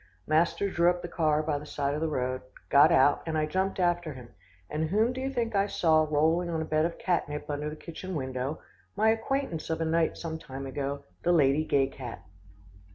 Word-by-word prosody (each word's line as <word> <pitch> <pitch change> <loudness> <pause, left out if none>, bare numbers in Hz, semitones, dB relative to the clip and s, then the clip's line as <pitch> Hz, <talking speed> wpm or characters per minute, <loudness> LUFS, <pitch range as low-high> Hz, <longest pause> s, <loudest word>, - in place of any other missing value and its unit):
Master 165 +5 +2
drew 175 -2 +3
up 175 0 -1
the - - -3
car 155 -3 +1
by 150 -2 -1
the 150 - -10
side 140 -1 -1
of 150 - -3
the 160 - 0
road, 130 -2 -2 0.3
got 145 +4 +7
out, 145 -2 +4
and 160 -1 -1
I 155 - +2
jumped 190 +5 -1
after 175 -3 +1
him, 125 -2 -11 0.4
and 155 +5 -2
whom 220 +6 +2
do 260 - -5
you 265 - -1
think 235 -3 -1
I 200 0 +2
saw 160 -5 +3
rolling 160 +4 +2
on 165 -1 -1
a 160 - -2
bed 155 +1 +1
of 170 - -3
cat 175 -5 0
nip 150 0 -5
under 145 +1 -2
the 150 - -7
kitchen 175 +3 -7
window 130 +1 -3 0.4
my 215 +2 +3
acquaintance 225 - -2
of 160 - -1
a 165 - 0
night 165 0 +1
some 160 -1 -5
time 135 -2 -7
ago 140 +1 -4 0.2
the 175 - +2
Lady 150 -2 +4
Gay 140 -3 +2
cat. 125 -3 -8
160 Hz, 225 wpm, -28 LUFS, 145-175 Hz, 0.4 s, got